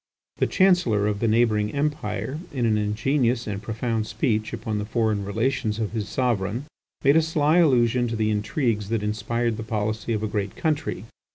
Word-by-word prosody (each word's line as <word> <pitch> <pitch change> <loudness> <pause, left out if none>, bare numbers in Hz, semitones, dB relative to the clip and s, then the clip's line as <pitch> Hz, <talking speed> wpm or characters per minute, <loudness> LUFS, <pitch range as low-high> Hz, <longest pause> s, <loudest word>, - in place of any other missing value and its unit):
The - - +2
Chancellor 175 - +3
of 105 -1 0
the 115 - +1
neighbouring 110 -2 +2
Empire 145 -2 -2
in 125 -4 -1
an 110 -2 +3
ingenious 115 +4 +1
and 100 -1 -4
profound 110 +1 -2
speech 110 0 -1
upon 110 -1 -3
the 105 - -3
foreign 110 -2 0
relations 110 +2 -1
of 110 -2 -2
his 105 -2 -3
sovereign, 120 0 -1 0.4
made 140 +3 +5
a - - +6
sly 160 +1 +2
allusion 125 -6 +3
to 115 - -3
the 110 -1 +1
intrigues 105 - -1
that 115 -2 -1
inspired 110 +2 -1
the - - -4
policy 110 0 -2
of 110 -1 -2
a - - 0
great 100 -2 -3
country. 150 - -2
110 Hz, 180 wpm, -24 LUFS, 105-125 Hz, 0.4 s, a